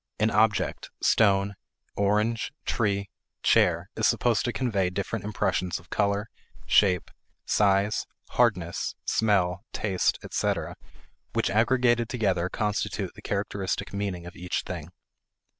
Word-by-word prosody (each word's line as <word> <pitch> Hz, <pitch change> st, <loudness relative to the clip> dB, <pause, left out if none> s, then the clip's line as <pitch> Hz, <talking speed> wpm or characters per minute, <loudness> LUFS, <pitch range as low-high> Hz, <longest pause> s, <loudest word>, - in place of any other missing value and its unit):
An 110 Hz, +1 st, +2 dB
object, 105 Hz, 0 st, +1 dB
stone, 100 Hz, -2 st, +3 dB, 0.4 s
orange, 105 Hz, +3 st, +1 dB
tree, 100 Hz, -3 st, 0 dB, 0.3 s
chair, -, -, +3 dB
is -, -, +2 dB
supposed 120 Hz, -3 st, +2 dB
to 120 Hz, -, 0 dB
convey 105 Hz, -8 st, 0 dB
different 100 Hz, +2 st, -3 dB
impressions 95 Hz, -4 st, -1 dB
of 85 Hz, -, -16 dB
color, 100 Hz, +1 st, +1 dB, 0.4 s
shape, 90 Hz, -4 st, +3 dB, 0.3 s
size, 100 Hz, +1 st, +2 dB, 0.2 s
hardness, 100 Hz, -8 st, +1 dB
smell, 95 Hz, -4 st, +2 dB
taste, 95 Hz, -4 st, +1 dB
etc., -, -, -1 dB, 0.6 s
which -, -, +1 dB
aggregated 120 Hz, +1 st, +3 dB
together 95 Hz, -7 st, 0 dB
constitute 105 Hz, 0 st, -2 dB
the -, -, -13 dB
characteristic 100 Hz, -2 st, -2 dB
meaning 100 Hz, -4 st, -3 dB
of 85 Hz, -, -10 dB
each 90 Hz, 0 st, -3 dB
thing. -, -, -6 dB
100 Hz, 115 wpm, -27 LUFS, 95-110 Hz, 0.6 s, stone